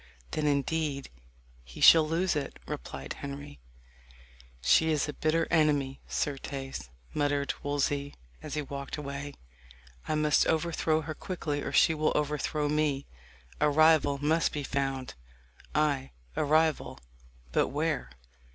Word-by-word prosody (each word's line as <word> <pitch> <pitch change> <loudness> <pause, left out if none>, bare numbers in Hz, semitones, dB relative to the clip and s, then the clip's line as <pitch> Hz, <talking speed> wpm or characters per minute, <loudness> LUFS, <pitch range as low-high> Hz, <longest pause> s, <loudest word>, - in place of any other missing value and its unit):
"Then, 155 -1 0
indeed, 145 - -1 0.5
he - - -12
shall 160 -2 +8
lose 170 +2 +1
it," 145 - -3
replied 65 +2 -6
Henry. 140 - -8 1.0
"She 160 - +4
is 155 -2 +1
a 150 - -4
bitter 160 +2 +1
enemy, 145 -5 +2
certes," 135 - -4 0.2
muttered 145 -1 0
Wolsey 145 0 -1 0.3
as 155 -1 -6
he 150 - -1
walked 140 +1 -6
away. 140 0 -6 0.7
"I - - 0
must 150 -1 +3
overthrow 160 -1 +1
her 155 0 -5
quickly, 155 -5 -3
or - - -4
she 160 - +5
will 155 0 +1
overthrow 150 0 0
me. 145 -2 0 0.5
A 150 - +4
rival 155 -1 +4
must 155 +3 +2
be 150 - -3
found 135 -1 -2 0.6
ay, 145 -3 +1 0.2
a - - +1
rival 155 +1 +2 0.5
but - - +2
where? 150 +1 -1
145 Hz, 130 wpm, -29 LUFS, 140-155 Hz, 1.0 s, shall